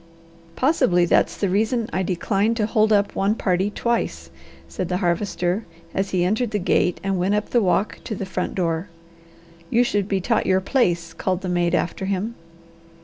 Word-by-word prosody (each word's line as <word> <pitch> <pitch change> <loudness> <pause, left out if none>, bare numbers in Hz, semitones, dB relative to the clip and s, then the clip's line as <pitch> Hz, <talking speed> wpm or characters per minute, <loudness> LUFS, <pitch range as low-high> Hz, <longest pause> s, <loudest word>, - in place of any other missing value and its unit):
"Possibly 185 - +3
that's - - +2
the 200 - 0
reason 220 +4 +1
I 190 - 0
decline 195 +4 0
to 220 -2 +1
hold 215 0 +2
up 205 -1 +3
one 200 +2 +1
party 190 -1 0
twice," 235 +3 -2 0.4
said 185 - -4
the 180 - 0
Harvester 180 +1 0 0.3
as 195 0 -1
he 185 -2 +1
entered 220 +6 +1
the 210 - -1
gate 180 -2 +1
and 195 -1 0
went 190 +3 +1
up 210 - -2
the 240 - +3
walk 195 +1 +1
to 220 - -3
the 195 - -4
front 190 - -3
door. 170 0 -1 0.8
"You 240 +1 +4
should 205 -5 0
be 195 -2 0
taught 225 +4 0
your 190 0 +4
place," 175 -6 0
called 185 +1 -2
the 185 - -4
maid 175 -1 +1
after 185 +3 -2
him. 200 +4 -2
195 Hz, 185 wpm, -22 LUFS, 180-215 Hz, 0.8 s, You